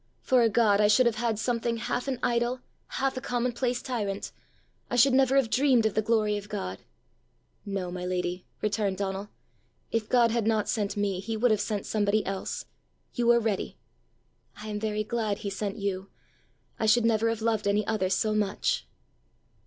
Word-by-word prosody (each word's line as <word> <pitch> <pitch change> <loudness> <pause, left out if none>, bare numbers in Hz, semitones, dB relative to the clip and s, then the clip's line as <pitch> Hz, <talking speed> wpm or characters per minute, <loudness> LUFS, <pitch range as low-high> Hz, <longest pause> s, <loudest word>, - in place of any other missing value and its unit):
For 255 -1 +4
a 230 - +4
God, 210 -2 +3
I 210 - +5
should 230 +5 +5
have 235 -2 +1
had 230 -2 0
something 230 0 -1
half 245 +3 -2
an 265 -2 -1
idol, 240 +1 0 0.3
half 270 -1 -1
a - - -3
commonplace 245 0 -1
tyrant! 205 -6 -3 0.6
I - - -1
should 255 +2 +5
never 265 0 +4
have 270 -5 +3
dreamed 255 -4 +4
of 220 - +1
the 215 - +2
glory 215 -1 +1
of 205 0 -8
God!" 95 - -4 0.9
"No, 190 -3 -3
my 180 0 -5
lady!" 180 0 -3 0.2
returned 205 -2 0
Donal; 195 +1 -3 0.6
"if 225 -2 -1
God 235 -2 +4
had 230 -2 0
not 220 -2 +1
sent 205 -3 -1
me, 200 -2 0
he 220 +3 -4
would 240 +1 +3
have 215 - +2
sent 210 -3 -2
somebody 210 0 +1
else; 195 0 -4 0.5
you 240 -2 0
were 240 0 +6
ready!" 220 -4 -2 0.8
"I 215 +1 -7
am 210 0 -3
very 215 0 -1
glad 215 -2 -1
he 200 -2 -5
sent 200 +2 -3
you! 195 -1 -3 0.7
I 220 - +1
should 230 +2 +4
never 225 0 +3
have 225 -1 -3
loved 220 -3 +1
any 205 +1 +2
other 210 -4 0
so 215 +3 +1
much!" 215 - 0
215 Hz, 185 wpm, -28 LUFS, 200-235 Hz, 0.9 s, were